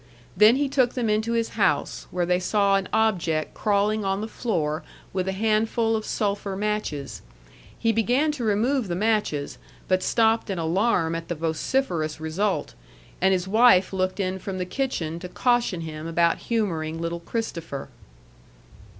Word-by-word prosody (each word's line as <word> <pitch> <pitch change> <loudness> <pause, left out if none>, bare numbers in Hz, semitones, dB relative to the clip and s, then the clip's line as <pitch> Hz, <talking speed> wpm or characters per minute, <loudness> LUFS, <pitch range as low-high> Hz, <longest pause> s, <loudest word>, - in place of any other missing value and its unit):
Then 215 +3 +7
he 285 +1 +1
took 260 -3 +1
them 235 -4 0
into 220 +2 0
his 230 -1 0
house, - - 0
where 180 -1 -1
they 180 +1 +2
saw 200 +1 +2
an 195 -1 -1
object 175 -8 +1
crawling 210 +1 +1
on 195 0 0
the 215 - -3
floor 165 -10 -2 0.3
with 185 0 -1
a - - +1
handful 225 +2 +1
of 215 -1 -3
sulphur 200 -2 -1
matches. 155 - -3 0.6
He 230 - +2
began 245 +7 +2
to 285 -5 -5
remove 225 +3 +1
the 175 - -2
matches, 205 -8 0 0.3
but 185 0 +2
stopped 225 +1 +2
in 195 - -2
alarm 170 +1 +1
at 165 0 -4
the 175 - -3
vociferous 160 - -1
result; 180 +6 -1 0.5
and 190 +1 +4
his 185 -1 0
wife 215 -3 +5
looked 185 +1 -1
in 190 -1 -1
from 190 0 -5
the 180 - -2
kitchen 180 - -2
to 180 - -7
caution 240 -5 +1
him 155 0 -6
about 170 0 +2
humoring 165 -9 -1
little 170 +1 -3
Christopher. 170 - -5
195 Hz, 160 wpm, -25 LUFS, 170-225 Hz, 0.6 s, Then